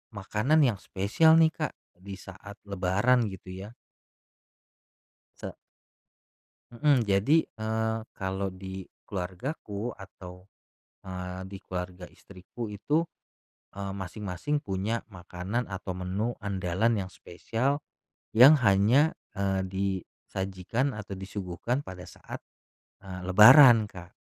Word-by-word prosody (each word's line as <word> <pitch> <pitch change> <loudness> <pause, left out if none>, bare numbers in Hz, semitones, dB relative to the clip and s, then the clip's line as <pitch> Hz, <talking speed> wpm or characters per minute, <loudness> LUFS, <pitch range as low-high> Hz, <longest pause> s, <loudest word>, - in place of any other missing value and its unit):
makanan 110 +10 +2
yang 115 -7 +1
spesial 110 +15 +3
nih, 160 -1 +5
Kak, 155 -1 -4 0.2
di 100 +1 -8
saat 95 +2 -11
lebaran, 100 +5 +1
gitu 95 -1 -9 0.2
ya. 115 - -14 1.7
Sa - - -6 1.2
Mhm, 135 +1 +3
jadi, 100 +9 +3 0.2
eee, 110 0 -1 0.2
kalau 95 0 -2
di 95 0 -8 0.2
keluargaku 100 - -4
atau, 90 -1 -12 0.6
eee, 90 0 -6
di 95 0 -8
keluarga 90 0 -6
istriku 100 +5 -9
itu, 150 +11 0 0.7
eee, 100 0 -5
masing-masing 100 +9 -3
punya 105 -1 -2
makanan 95 +5 -4
atau 95 -1 -5
menu 95 +6 -2
andalan 100 +2 0
yang - - -12
spesial, 120 - -2 0.5
yang 130 +7 +9
hanya, 115 +8 +4 0.2
eee, 95 -1 0
disajikan 95 +4 -3
atau 105 -3 -7
disuguhkan 95 +5 -3
pada 95 -9 -9
saat, - - -10 0.6
eee, 95 -1 -7
lebaran, 115 +4 +9
Kak. 90 -1 -11
100 Hz, 105 wpm, -28 LUFS, 95-115 Hz, 1.7 s, yang